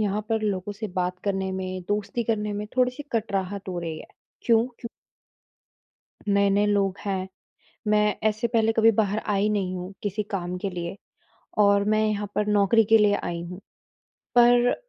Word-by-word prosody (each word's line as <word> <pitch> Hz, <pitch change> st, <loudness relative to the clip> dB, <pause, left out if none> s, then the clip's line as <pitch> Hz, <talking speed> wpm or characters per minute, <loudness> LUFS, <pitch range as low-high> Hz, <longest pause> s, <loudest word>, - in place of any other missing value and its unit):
यहाँ 210 Hz, 0 st, 0 dB
पर 225 Hz, -1 st, 0 dB
लोगों 205 Hz, -1 st, -2 dB
से 215 Hz, +2 st, -5 dB
बात 180 Hz, 0 st, -1 dB
करने 190 Hz, -1 st, -1 dB
में, 185 Hz, 0 st, -4 dB
दोस्ती 210 Hz, +3 st, -1 dB
करने 210 Hz, -2 st, -1 dB
में 205 Hz, +1 st, -4 dB
थोड़ी-सी 250 Hz, +2 st, +1 dB
कटराहट 200 Hz, -3 st, -2 dB
हो 180 Hz, -2 st, -3 dB
रही 165 Hz, -2 st, -4 dB
है। -, -, -11 dB, 0.4 s
क्यों? 230 Hz, 0 st, +3 dB
क्यू 235 Hz, -, -6 dB, 1.4 s
नए-नए 200 Hz, 0 st, +3 dB
लोग 200 Hz, -2 st, +1 dB
हैं, 190 Hz, -1 st, -2 dB, 0.6 s
मैं 210 Hz, 0 st, +3 dB
ऐसे 215 Hz, +2 st, -1 dB
पहले 225 Hz, -1 st, +2 dB
कभी 225 Hz, 0 st, +5 dB
बाहर 210 Hz, 0 st, +2 dB
आई 205 Hz, 0 st, +2 dB
नहीं 190 Hz, -3 st, -1 dB
हूँ 180 Hz, +2 st, -6 dB
किसी 205 Hz, +1 st, -2 dB
काम 180 Hz, -3 st, -3 dB
के 195 Hz, +2 st, -3 dB
लिए 175 Hz, 0 st, -5 dB, 0.6 s
और 200 Hz, -1 st, +5 dB
मैं 215 Hz, 0 st, +3 dB
यहाँ 210 Hz, -1 st, -1 dB
पर 210 Hz, -, 0 dB
नौकरी 210 Hz, +2 st, +4 dB
के 225 Hz, +2 st, +5 dB
लिए 210 Hz, -1 st, +4 dB
आई 170 Hz, -1 st, -3 dB
हूँ, 180 Hz, +1 st, -8 dB, 0.8 s
पर 245 Hz, 0 st, +5 dB
205 Hz, 170 wpm, -25 LUFS, 190-215 Hz, 1.4 s, कभी